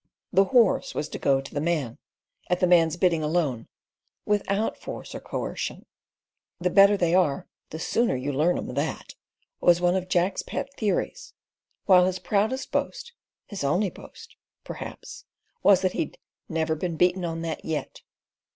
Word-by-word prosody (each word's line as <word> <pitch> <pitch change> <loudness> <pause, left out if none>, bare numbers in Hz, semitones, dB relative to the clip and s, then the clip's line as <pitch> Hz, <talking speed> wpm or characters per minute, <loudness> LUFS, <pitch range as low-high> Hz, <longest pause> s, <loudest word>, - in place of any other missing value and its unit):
The 195 - +5
horse 235 -1 +3
was 150 - -2
to - - -6
go 135 -1 +2
to 135 - -11
the 145 - -1
man, 155 -8 -1 0.5
at 180 0 +1
the - - +3
man's 170 -2 +4
bidding 175 -3 +2
alone, 150 -7 -1 0.6
without 205 +1 0
force - - -8
or - - -5
coercion. - - -5 0.7
"The 180 +1 0
better 200 +1 +6
they 175 -2 +1
are 175 -7 +2 0.2
the 160 - -6
sooner 230 - +1
you 135 +3 -3
learn 155 +6 +2
'em - - -5
that," 145 +4 -3 0.5
was 175 -1 +4
one 175 0 +2
of 185 -1 -2
Jack's 180 +1 +1
pet 275 0 -5
theories, 275 - -2 0.5
while 180 -1 +6
his 185 0 -1
proudest 215 +7 -1
boast—his 345 - -5
only 180 +8 +1
boast—perhaps - - -11 0.4
was 195 -2 +5
that 185 -1 +1
he'd 155 - -3 0.3
"never 160 0 0
been 165 +1 -3
beaten 180 +2 +2
on 165 -1 -3
that 165 -1 -4
yet." 160 -2 -4
180 Hz, 155 wpm, -26 LUFS, 160-200 Hz, 0.7 s, better